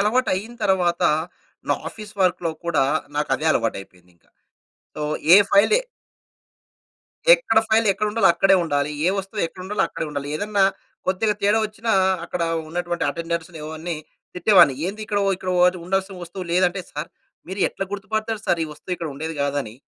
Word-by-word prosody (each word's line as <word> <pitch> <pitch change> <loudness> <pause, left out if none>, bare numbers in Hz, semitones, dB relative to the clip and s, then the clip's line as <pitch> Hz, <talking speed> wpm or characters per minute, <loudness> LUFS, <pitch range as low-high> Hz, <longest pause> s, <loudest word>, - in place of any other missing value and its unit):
అలవాటైన 215 0 0
తరువాత 180 -2 +1 0.7
నా - - +4
ఆఫీస్ 210 -1 -11
వర్క్‌లో 180 -2 +2
కూడా 155 -6 +2 0.3
నాకు 150 0 -1
అదే 160 - -2
అలవాటు 115 -6 +1
అయిపోయింది 90 -2 -17
ఇంక. - - -36 0.7
సో, 150 - -5 0.3
ఏ - - +11
ఫైల్ 200 - +5
ఏ - - -5 1.5
ఎక్కడ - - +2
ఫైల్ 220 0 +3
ఎక్కడ 210 +3 -2
ఉండాలో 210 -4 +3
అక్కడే 195 +3 +4
ఉండాలి. 145 -1 0 0.2
ఏ - - +5
వస్తువు 195 +2 -3
ఎక్కడ 185 - -13
ఉండాలో 210 +2 0
అక్కడే 155 - -4
ఉండాలి. 145 -1 -4
ఏదన్నా 205 0 +1 0.4
కొద్దిగా 205 +3 +1
తేడా 210 +2 +4
వచ్చిన, 215 +2 -6 0.4
అక్కడ 175 -1 -3 0.3
ఉన్నటువంటి 175 0 -2
అటెండర్స్‌ని 170 0 -4
ఇవన్నీ 160 +1 -5 0.4
తిట్టేవాడిని. 180 -6 +5
ఏంది 210 +3 -5
ఇక్కడ, 205 -2 0 0.2
ఇక్కడ 185 0 -4 0.3
ఉండాల్సిన 190 +1 -1
వస్తువు 180 +2 -7
లేదంటే 180 +1 +2
"సారు 150 - -5 0.4
మీరు 190 +1 -5
ఎట్లా 195 - -5
గుర్తుపడతారు 215 +2 -3
సారు 170 - +1
ఈ - - -6
వస్తువు 165 +4 -8
ఇక్కడ 165 -2 -5
ఉండేది 160 +3 -5
కాదని. 140 -6 -2
185 Hz, 155 wpm, -22 LUFS, 160-205 Hz, 1.5 s, ఏ